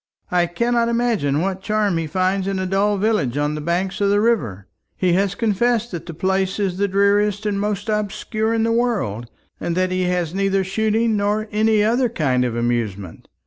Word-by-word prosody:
"I 175 -1 +2
cannot 235 +6 0
imagine 225 - +1
what 190 +1 -2
charm 210 -2 0
he 165 - -3
finds 185 +4 0
in 195 -1 -1
a 190 - -2
dull 200 +2 +1
village 195 - 0
on 145 +1 0
the 150 - -4
banks 180 +5 -2
of 200 - +3
the 205 0 +3
river. 120 - 0 0.3
He 180 -2 +2
has 195 +1 +1
confessed 235 +2 0
that 175 -2 -6
the 170 - -6
place 190 +2 0
is 190 -3 -1
the 200 - +2
dreariest 200 +1 +2
and 205 -1 0
most 205 0 -2
obscure 215 +1 -1
in 225 -1 +1
the 230 - +1
world, 205 - -1 0.3
and 170 0 -2
that 185 0 +1
he 185 0 0
has 180 -2 -1
neither 195 0 +1
shooting 220 +3 +1
nor 210 +2 0
any 215 0 +2
other 240 +3 +2
kind 135 - 0
of 120 -2 -2
amusement. 115 -6 -3
195 Hz, 195 wpm, -21 LUFS, 175-215 Hz, 0.3 s, of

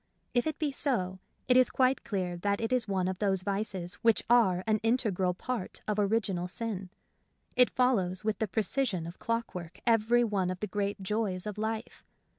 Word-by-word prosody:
If 245 +4 +2
it 310 - -2
be 300 -2 0
so, 190 -10 -1 0.3
it 250 - +4
is 255 -1 +6
quite 260 0 +2
clear 185 -4 -2
that 200 +3 0
it 225 +2 -1
is 250 -4 +1
one 190 -2 0
of 185 -1 -3
those 195 -3 +1
vices 195 -3 -2
which 230 -1 +4
are 190 -7 +4
an 215 -1 +2
integral 215 -6 +1
part 245 0 -4
of 210 0 0
original 200 -4 +1
sin. 195 -1 -4 0.7
It 250 -1 +6
follows 200 -7 +1
with 215 0 -1
the 220 - 0
precision 215 -3 0
of 170 +2 -9
clockwork 185 -7 -3
every 235 +1 +4
one 200 -5 0
of 185 0 -4
the - - -1
great 200 0 -2
joys 195 -2 -1
of 210 0 -5
life. 220 0 -4
210 Hz, 185 wpm, -30 LUFS, 185-230 Hz, 0.7 s, is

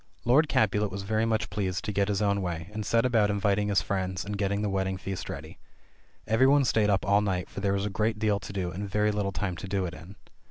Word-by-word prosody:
Lord 145 +6 +4
Capulet 105 -1 +2
was 100 +1 -5
very 110 +2 0
much 110 -1 -1
pleased 95 -4 -2
to 105 - -1
get 100 -1 +1
his 105 0 0
own 100 -1 +1
way, 85 0 -4
and 110 0 -3
set 115 +3 +2
about 115 -4 +3
inviting 100 0 +1
his 100 -1 +2
friends 95 -2 -2
and 105 0 -4
gettinp 100 +1 -1
the 105 - 0
wedding 95 0 -1
feast 95 0 -5
ready. - - -8 0.7
Every 115 +5 +4
one 140 0 +4
stayed 110 -3 +2
up 100 -1 +1
all 100 +1 +4
night, 95 -3 -2
for - - -6
there 100 0 +1
was 100 0 -1
a - - -1
great 110 +2 0
deal 105 -1 +1
to - - -8
do, 95 -3 -3
and 100 +4 -5
very 105 +2 +2
little 105 -2 -1
time 95 -1 -3
to 95 - -7
do 95 -1 -1
it 85 - -5
in. 90 +3 -11
100 Hz, 255 wpm, -28 LUFS, 95-105 Hz, 0.7 s, Lord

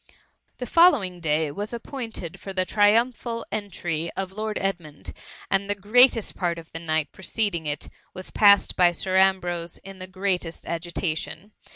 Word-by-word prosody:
•* - - -24 0.4
The 250 - -4
following 255 - +4
day 155 -2 0
was 205 +9 -4
appointed 230 - -7
for 195 - -7
the 185 -1 0
triumphal 230 +3 +2
entry 175 -6 -3
of 190 -1 -3
Lord 215 +2 -3
Edmund, 175 -7 -4 0.4
and 195 +1 +1
the 205 - +1
greatest 225 +3 +4
part 175 -2 -1
of 165 -1 -11
the 165 - -7
night 160 -2 -1
preceding 190 -4 -2
it, 145 0 -3 0.2
was 185 0 -9
passed 200 -1 +5
by 175 -1 +4
Sir 185 +2 0
Ambrose 175 -3 +1
in 195 0 -10
the 185 - -7
greatest 185 -3 -2
agita* 170 0 -3
tion. 200 +7 -8
190 Hz, 165 wpm, -25 LUFS, 170-210 Hz, 0.4 s, passed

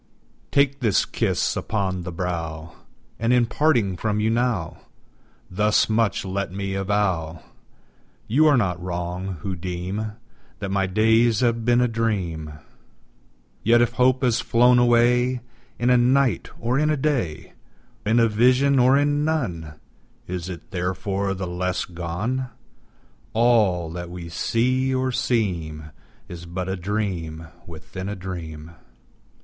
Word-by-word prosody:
Take 140 0 +2
this 110 -6 +2
kiss - - 0
upon 95 -4 -2
the 90 +1 -6
brow! 85 -2 -4 0.5
And, 115 +1 +1
in 125 -1 +4
parting 115 -8 +1
from 105 +2 -1
you 110 +1 +1
now, 115 -7 -1 0.7
Thus 105 +4 +2
much 110 -3 +1
let 95 0 -3
me 100 0 -4
avow 95 -5 -1 0.8
You 150 +8 +4
are 145 -3 +5
not 90 -7 0
wrong, 90 +1 -4
who 95 +2 -3
deem 90 +4 -4 0.4
That 95 +7 -5
my 95 0 +1
days 110 +3 +3
have 115 -2 +1
been 120 0 +4
a 125 - +3
dream: 95 -10 -2 1.1
Yet 120 +2 +4
if 120 -1 +3
hope 130 +1 +2
has 120 -2 +2
flown 125 +1 +4
away 120 +1 +3 0.4
In 120 +1 +2
a 125 - +6
night, 125 -3 +2
or 120 +4 0
in 150 0 +2
a 155 - +1
day, 130 - -2 0.5
In 110 +3 +2
a 115 - +5
vision 130 +5 +3
or 130 +2 +5
in 145 +1 +1
none, 90 - -2 0.5
Is 90 0 -5
it 85 -3 -9
therefore 95 +2 -2
the 95 0 -4
less 90 +1 -2
gone? 90 +10 -3 0.9
All 105 -8 +3
that 85 0 -6
we 90 -1 -8
see 130 +8 0
or 130 0 0
seem 85 - -1 0.4
Is 85 -1 -9
but 90 +1 -4
a 95 - -1
dream 90 -5 -3 0.2
within 85 +4 -7
a 105 - -4
dream. 85 -4 -7
105 Hz, 140 wpm, -23 LUFS, 90-120 Hz, 1.1 s, a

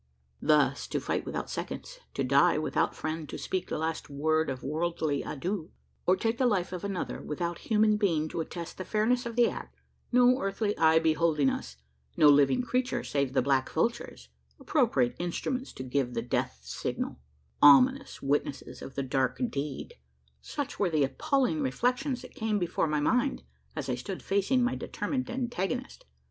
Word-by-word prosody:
Thus 145 -3 +3
to - - -1
fight - - -2
without - - -3
seconds; - - -6 0.2
to - - 0
die - - +4
without - - 0
friend 155 -1 -4
to - - -5
speak 185 -1 -3
the - - -2
last 160 0 -3
word 155 +2 +1
of 130 -1 -5
worldly 155 0 -1
adieu; 175 +3 -4 0.4
or 185 - +6
to 190 - -9
take 225 +1 0
the 255 - +4
life 185 -5 0
of 180 - -5
another, 200 -2 -3
without 170 +3 -3
human 215 -1 +4
being 165 -7 +1
to 165 - -3
attest 170 +2 -7
the - - -2
fairness 235 +5 +1
of 230 - -6
the 240 -1 +5
act - - -6 0.4
no 250 +1 +5
earthly 205 +2 -1
eye 160 0 +5
beholding 160 -3 +3
us 60 0 -6 0.4
no 150 - +7
living 145 - +5
creature 250 +1 -1
save 140 -2 -1
the 130 - +2
black 135 -1 +2
vultures 230 +9 -2 0.3
appropriate 215 - +2
instruments 250 +9 -3
to 130 - -7
give 130 -1 -1
the 115 - -1
death 120 - -1
signal - - -4 0.4
ominous 260 - +6
witnesses 140 0 -2
of 135 - -9
the 140 - -1
dark 130 -1 0
deed: 145 - -4 0.5
such 290 -3 -5
were 195 - +2
the 155 -3 +2
appalling 275 - +1
reflections 255 0 0
that 255 - -11
came 220 -2 -1
before 175 -3 0
my 150 -1 0
mind, 250 - +1 0.3
as - - -4
I - - 0
stood 195 -3 -5
facing 200 +6 +2
my 245 - +1
determined 260 -3 -3
antagonist. 250 - -3
175 Hz, 175 wpm, -29 LUFS, 145-245 Hz, 0.5 s, no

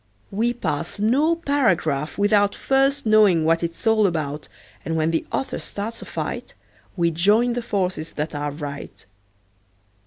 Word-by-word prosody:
We 225 +4 +1
pass 165 -8 -3
no 270 +11 +2
paragraph 190 - 0
without 205 0 +3
First 270 +1 +1
knowing 210 -7 +5
what 165 +1 +3
it's 170 +4 -4
all 220 -2 +4
about, 150 -4 -3 0.4
And 165 - -2
when 160 0 +1
the 165 - -1
author 270 - -2
starts 220 +3 -4
a - - -8
fight - - -5 0.4
We 170 -1 +2
join 210 +9 +3
the 245 - -2
forces 185 -8 -2
that 150 +2 -3
are 145 0 -2
right. 145 -5 -8
200 Hz, 150 wpm, -22 LUFS, 160-230 Hz, 0.4 s, knowing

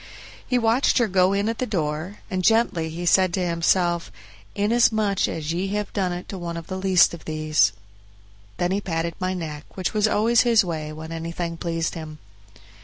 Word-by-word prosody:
He 250 - +2
watched 235 +3 +2
her 240 -3 +3
go 185 -1 +3
in 200 +1 0
at 225 0 -2
the 255 - -1
door, 160 +1 -3
and 185 -1 -1
gently 220 -7 +2
he 170 +2 -5
said 185 +1 +4
to 185 -2 -1
himself, 170 0 +1 0.4
"Inasmuch 215 -1 +2
as 160 0 -3
ye 180 +3 -1
have 210 -1 -4
done 190 -3 0
it 175 0 -6
to 195 - -6
one 170 -1 -5
of 165 - -7
the 185 - -5
least 190 -3 +4
of 170 - -10
these." 155 0 +2 0.9
Then 175 +1 0
he 200 +2 0
patted 165 -2 -2
my 185 0 -1
neck, 155 -3 -7
which 185 - -2
was 215 0 +3
always 225 +2 +3
his 230 -4 +4
way 155 -3 -4
when 160 +1 -8
anything 165 +1 -4
pleased 165 -1 -2
him. 155 -2 -8
180 Hz, 190 wpm, -23 LUFS, 165-205 Hz, 0.9 s, said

